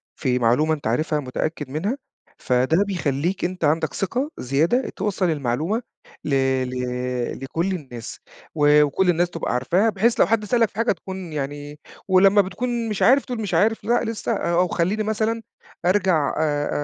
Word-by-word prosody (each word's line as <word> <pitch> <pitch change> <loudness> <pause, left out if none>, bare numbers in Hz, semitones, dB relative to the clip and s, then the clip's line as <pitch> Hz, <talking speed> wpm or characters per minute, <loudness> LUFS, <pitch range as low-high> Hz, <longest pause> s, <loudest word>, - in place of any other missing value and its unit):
في 125 -3 0
معلومة 125 +7 +3
أنت 145 -7 -4
عارفها 150 +6 0
متأكد 145 +2 -4
منها، 185 - -2 0.4
فده 130 +9 +2
بيخليك 175 -1 -1
أنت 180 0 -4
عندك 155 +3 +1
ثقة 255 +10 -2
زيادة 160 - +1
توصّل 195 -2 -1
المعلومة 155 - -1 0.4
ل - - -4 0.4
ل 125 -1 -3
لكل 165 +8 -1
الناس 125 -10 -7 0.4
و 150 -1 +5
وكل 180 +6 +1
الناس 175 0 +2
تبقى 165 -8 -3
عارفاها، 175 - +2
بحيث 220 +3 +1
لو - - +6
حد 220 -1 +1
سألك 230 0 +2
في - - -31
حاجة 230 +3 +1
تكون 190 -2 -6
يعني 145 +1 -5 0.3
ولما 195 +2 +5
بتكون 230 +5 -3
مش 210 - -3
عارف 265 +3 +5
بتقول 245 -3 -5
مش 205 - -4
عارف 220 +2 +2
لأ 240 - +1
لسه 225 0 -3
أو 180 -3 +1
خليني 185 +6 0
مثلًا 220 +1 -1 0.4
أرجع 180 -5 +2
آآ، 145 -2 0
175 Hz, 160 wpm, -22 LUFS, 145-210 Hz, 0.4 s, لو